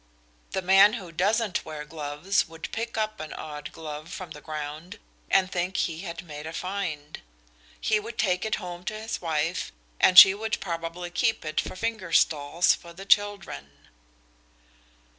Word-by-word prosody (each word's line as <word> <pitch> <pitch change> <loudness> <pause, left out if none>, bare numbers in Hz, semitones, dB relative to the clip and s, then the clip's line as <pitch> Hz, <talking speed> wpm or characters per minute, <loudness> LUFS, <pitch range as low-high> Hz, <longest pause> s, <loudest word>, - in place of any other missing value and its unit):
The 190 - -1
man 195 +3 +7
who 185 -8 -6
doesn't 205 +4 +1
wear 155 -1 -7
gloves 150 +5 -1
would 165 0 -7
pick 230 0 -4
up 215 0 -1
an 155 -1 -6
odd 150 -1 -7
glove 155 0 -8
from 180 -3 -7
the 150 - -9
ground 155 +6 -6 0.3
and 190 -1 +3
think 180 +1 -1
he 160 -1 -1
had 170 -2 -6
made 150 -1 -8
a 160 - -6
find. 170 -6 -4 0.6
He 215 - +2
would 225 +2 -8
take 180 -3 +1
it 220 - 0
home 175 -2 -7
to 215 +2 -3
his 220 +1 -4
wife 165 +1 -1 0.3
and 185 - +5
she 190 +1 +12
would 215 +1 -3
probably 170 0 -5
keep 225 +1 0
it 155 0 0
for - - -7
finger 215 -4 -3
stalls 155 +3 +3
for 170 0 -10
the 190 +3 -10
children." 195 - 0
175 Hz, 165 wpm, -26 LUFS, 155-200 Hz, 0.6 s, she